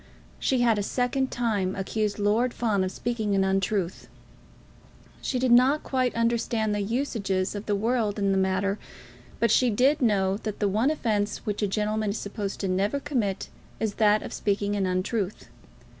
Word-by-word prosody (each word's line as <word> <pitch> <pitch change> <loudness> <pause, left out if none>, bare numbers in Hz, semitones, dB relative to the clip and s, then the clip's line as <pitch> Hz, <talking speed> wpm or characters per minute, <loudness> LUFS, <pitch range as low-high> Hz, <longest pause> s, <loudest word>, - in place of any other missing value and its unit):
She 260 -2 +1
had 230 -3 +3
a - - +1
second 255 +5 0
time 205 -6 -1
accused 205 +2 -2
Lord 220 +4 +1
Fawn 210 -5 +1
of 185 - -2
speaking 220 -3 -2
an 195 - +3
untruth. 190 -1 -1 1.1
She 260 - -1
did 250 0 +1
not 260 +5 +5
quite 255 -2 0
understand 230 -2 0
the 205 - -1
usages 200 -5 -1
of 205 0 -6
the 205 - +1
world 220 0 0
in 200 -1 +1
the 195 - +2
matter; 190 +2 0 0.6
but 230 - +3
she 255 - +4
did 265 +7 +3
know 195 -5 +2
that 215 -1 -5
the 205 - +1
one 215 +7 +2
offence 215 -8 -1
which 210 0 -2
a 205 - +2
gentleman 215 +1 -1
is 200 - -2
supposed 200 -1 -4
never 195 +8 +1
to 280 - -8
commit 220 -10 -1 0.3
is 220 -2 -1
that 210 0 +4
of - - -7
speaking 205 0 0
an 195 -2 0
untruth. 185 +2 -2
210 Hz, 175 wpm, -26 LUFS, 200-235 Hz, 1.1 s, not